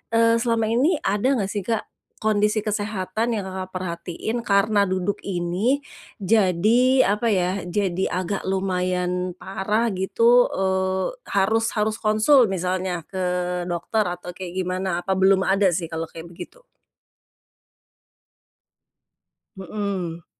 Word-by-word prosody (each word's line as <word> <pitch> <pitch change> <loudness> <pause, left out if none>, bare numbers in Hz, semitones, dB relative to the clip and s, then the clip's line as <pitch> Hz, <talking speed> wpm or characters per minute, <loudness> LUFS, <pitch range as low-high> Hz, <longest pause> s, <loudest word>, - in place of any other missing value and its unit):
eee, 230 0 +4
selama 230 -2 0
ini 280 +10 +3
ada 210 +7 +1
enggak 200 -5 -2
sih 205 -3 -4
Kak, 225 -2 0 0.4
kondisi 210 0 +2
kesehatan 210 +1 -2
yang 205 - -2
Kakak 185 0 -6
perhatiin 185 +6 -4
karena 200 0 +3
duduk 185 +1 -1
ini, 195 +10 0 0.4
jadi 225 +6 +4
apa 210 +4 +1
ya 185 -2 0
jadi 190 0 0
agak 185 +2 -3
lumayan 180 -1 -1
parah 210 +5 -1
gitu, 230 +6 +4
eee, 190 - -1
harus 220 +3 +1
harus 215 +1 0
konsul 220 +4 +4
misalnya 185 -2 -2
ke 190 - -4 0.5
dokter 180 +5 -1
atau 180 0 -5
kayak 180 0 -8
gimana? 185 -1 -2
Apa 190 -1 -1
belum 190 0 +4
ada 195 +1 +3
sih 165 -1 -4
kalau 165 0 -3
kayak 165 +1 -11
begitu? - - -11 2.9
Mhm. 190 -3 -4
195 Hz, 120 wpm, -23 LUFS, 185-220 Hz, 2.9 s, eee